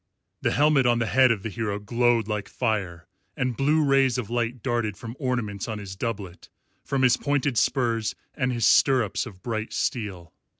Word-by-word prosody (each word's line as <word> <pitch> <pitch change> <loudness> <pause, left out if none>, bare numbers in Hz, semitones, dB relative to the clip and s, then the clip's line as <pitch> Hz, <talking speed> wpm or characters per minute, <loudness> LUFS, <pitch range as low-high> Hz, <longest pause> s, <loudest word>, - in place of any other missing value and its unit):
The - - +1
helmet 145 -2 +3
on 120 -1 +3
the 115 - 0
head 130 +6 +4
of 110 -4 0
the 115 - -3
hero 105 -1 -3
glowed 115 +1 +1
like 105 -2 -3
fire, 100 -8 -2 0.3
and 125 -1 -1
blue 150 +4 +2
rays 135 -3 +3
of 120 -3 -4
light 120 0 -2
darted 120 -5 -1
from 115 +1 -8
ornaments 120 - -2
on 110 -2 -4
his 100 -2 -7
doublet, 95 -4 -5 0.3
from 135 -1 -1
his 125 -1 +5
pointed 145 -2 0
spurs 115 +1 +1 0.2
and 130 -2 -1
his 120 -2 0
stirrups 125 -3 +3
of 95 -5 -13
bright 110 -1 -3
steel. 95 -8 -3
115 Hz, 180 wpm, -25 LUFS, 105-130 Hz, 0.3 s, his